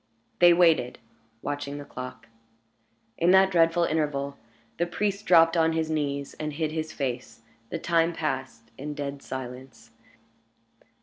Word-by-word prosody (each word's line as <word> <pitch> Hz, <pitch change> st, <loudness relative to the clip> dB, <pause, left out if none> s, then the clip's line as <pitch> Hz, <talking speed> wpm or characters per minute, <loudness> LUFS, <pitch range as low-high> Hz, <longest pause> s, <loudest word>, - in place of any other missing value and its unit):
They 175 Hz, 0 st, +8 dB
waited, 165 Hz, -7 st, +3 dB, 0.5 s
watching 145 Hz, 0 st, -4 dB
the 145 Hz, -, -8 dB
clock. 125 Hz, -3 st, -8 dB, 0.9 s
In 170 Hz, -, +3 dB
that 190 Hz, +1 st, +6 dB
dreadful 170 Hz, 0 st, +3 dB
interval, 145 Hz, -3 st, -1 dB, 0.4 s
the 175 Hz, -, +1 dB
priest 200 Hz, +3 st, -2 dB
dropped 165 Hz, -1 st, +6 dB
on 165 Hz, -1 st, +3 dB
his 160 Hz, -1 st, -1 dB
knees 140 Hz, -2 st, -2 dB
and 150 Hz, -1 st, -3 dB
hid 155 Hz, +1 st, -2 dB
his 155 Hz, 0 st, -3 dB
face. 125 Hz, -4 st, -4 dB, 0.3 s
The -, -, -3 dB
time 165 Hz, 0 st, +2 dB
passed 130 Hz, -8 st, -4 dB
in 150 Hz, +2 st, -5 dB
dead 140 Hz, -1 st, -5 dB
silence. 125 Hz, -2 st, -8 dB
150 Hz, 135 wpm, -26 LUFS, 135-165 Hz, 0.9 s, They